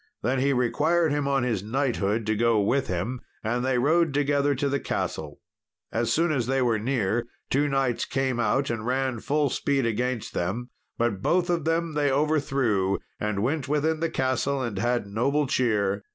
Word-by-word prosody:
Then 130 Hz, +4 st, +1 dB
he 140 Hz, +2 st, +2 dB
required 150 Hz, +6 st, +2 dB
him 145 Hz, -1 st, 0 dB
on 135 Hz, -2 st, +1 dB
his 115 Hz, -6 st, 0 dB
knighthood 110 Hz, -2 st, -1 dB
to 110 Hz, 0 st, +1 dB
go 115 Hz, 0 st, +3 dB
with 125 Hz, +7 st, +1 dB
him, 95 Hz, +8 st, -3 dB, 0.2 s
and 120 Hz, +3 st, -1 dB
they 130 Hz, -1 st, +1 dB
rode 155 Hz, +3 st, +2 dB
together 145 Hz, 0 st, +2 dB
to 140 Hz, +2 st, 0 dB
the 140 Hz, 0 st, 0 dB
castle. 75 Hz, -2 st, -4 dB, 0.5 s
As 115 Hz, +1 st, 0 dB
soon 165 Hz, +1 st, +2 dB
as 125 Hz, -6 st, 0 dB
they 135 Hz, +1 st, +1 dB
were 120 Hz, -4 st, +2 dB
near, 115 Hz, -1 st, 0 dB, 0.2 s
two 145 Hz, +2 st, +2 dB
knights 135 Hz, -4 st, 0 dB
came 130 Hz, -2 st, -1 dB
out 120 Hz, +5 st, +1 dB
and 115 Hz, -2 st, -3 dB
ran 130 Hz, 0 st, -1 dB
full 145 Hz, +2 st, 0 dB
speed 140 Hz, -3 st, 0 dB
against 120 Hz, +1 st, -2 dB
them; 115 Hz, +8 st, -3 dB, 0.3 s
but 115 Hz, -5 st, 0 dB
both 175 Hz, -, +2 dB
of 170 Hz, -4 st, -1 dB
them 165 Hz, 0 st, 0 dB
they 145 Hz, -2 st, +1 dB
overthrew, 135 Hz, -9 st, +1 dB, 0.2 s
and 105 Hz, -1 st, -1 dB
went 145 Hz, +3 st, -1 dB
within 155 Hz, +2 st, +1 dB
the 165 Hz, 0 st, 0 dB
castle, 135 Hz, +1 st, 0 dB
and 115 Hz, -7 st, -3 dB
had 120 Hz, +1 st, 0 dB
noble 135 Hz, +9 st, 0 dB
cheer. 105 Hz, -6 st, +1 dB
130 Hz, 180 wpm, -26 LUFS, 115-145 Hz, 0.5 s, go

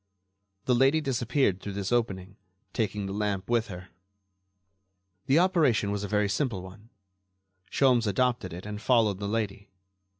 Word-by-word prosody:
The 125 Hz, -, +2 dB
lady 135 Hz, +5 st, +4 dB
disappeared 125 Hz, -, 0 dB
through 100 Hz, -, -6 dB
this 100 Hz, +1 st, -4 dB
opening, 95 Hz, -6 st, -1 dB, 0.4 s
taking 105 Hz, -2 st, -2 dB
the 95 Hz, -, -4 dB
lamp 100 Hz, -2 st, -2 dB
with 115 Hz, -2 st, +1 dB
her. 90 Hz, -1 st, -9 dB, 1.4 s
The 135 Hz, -, +4 dB
operation 160 Hz, -, +3 dB
was 105 Hz, 0 st, -3 dB
a -, -, -3 dB
very 105 Hz, 0 st, +1 dB
simple 105 Hz, -4 st, -2 dB
one. 100 Hz, +4 st, -13 dB, 0.8 s
Sholmes 125 Hz, -5 st, +3 dB
adopted 120 Hz, -2 st, 0 dB
it 90 Hz, +3 st, -8 dB
and 105 Hz, 0 st, -6 dB
followed 110 Hz, -6 st, +2 dB
the 100 Hz, -, -3 dB
lady. 105 Hz, -2 st, -3 dB
105 Hz, 145 wpm, -28 LUFS, 100-125 Hz, 1.4 s, lady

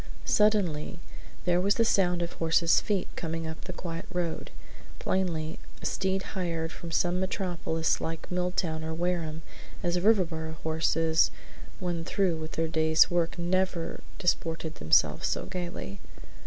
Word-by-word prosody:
Suddenly 195 Hz, -7 st, +2 dB, 0.5 s
there 175 Hz, 0 st, +3 dB
was 200 Hz, +2 st, +3 dB
the 230 Hz, -, +3 dB
sound 180 Hz, -5 st, +3 dB
of 170 Hz, -, -4 dB
a -, -, -12 dB
horse's 165 Hz, 0 st, +4 dB
feet 205 Hz, -4 st, 0 dB
coming 165 Hz, -1 st, -3 dB
up 160 Hz, 0 st, -6 dB
the 185 Hz, -, -4 dB
quiet 170 Hz, -2 st, -5 dB
road; 175 Hz, -3 st, -2 dB, 0.5 s
plainly 165 Hz, -4 st, -1 dB, 0.2 s
a -, -, -9 dB
steed 190 Hz, 0 st, 0 dB
hired 165 Hz, -4 st, -2 dB
from 170 Hz, -, -8 dB
some 175 Hz, +2 st, +1 dB
metropolis 175 Hz, -4 st, 0 dB
like 165 Hz, +1 st, -4 dB
Milltown 180 Hz, -3 st, -1 dB
or 160 Hz, 0 st, -3 dB
Wareham, 165 Hz, -2 st, -1 dB, 0.4 s
as 175 Hz, 0 st, +1 dB
Riverboro 175 Hz, -6 st, +2 dB
horses 160 Hz, 0 st, +3 dB, 0.5 s
when 175 Hz, -3 st, -2 dB
through 180 Hz, -1 st, +1 dB
with 155 Hz, 0 st, -6 dB
their 165 Hz, 0 st, 0 dB
day's 160 Hz, +2 st, +4 dB
work 170 Hz, -1 st, +1 dB
never 180 Hz, -1 st, 0 dB, 0.2 s
disported 165 Hz, -3 st, 0 dB
themselves 80 Hz, 0 st, +3 dB
so -, -, -1 dB
gayly. 175 Hz, -, -5 dB
170 Hz, 140 wpm, -29 LUFS, 160-180 Hz, 0.5 s, horse's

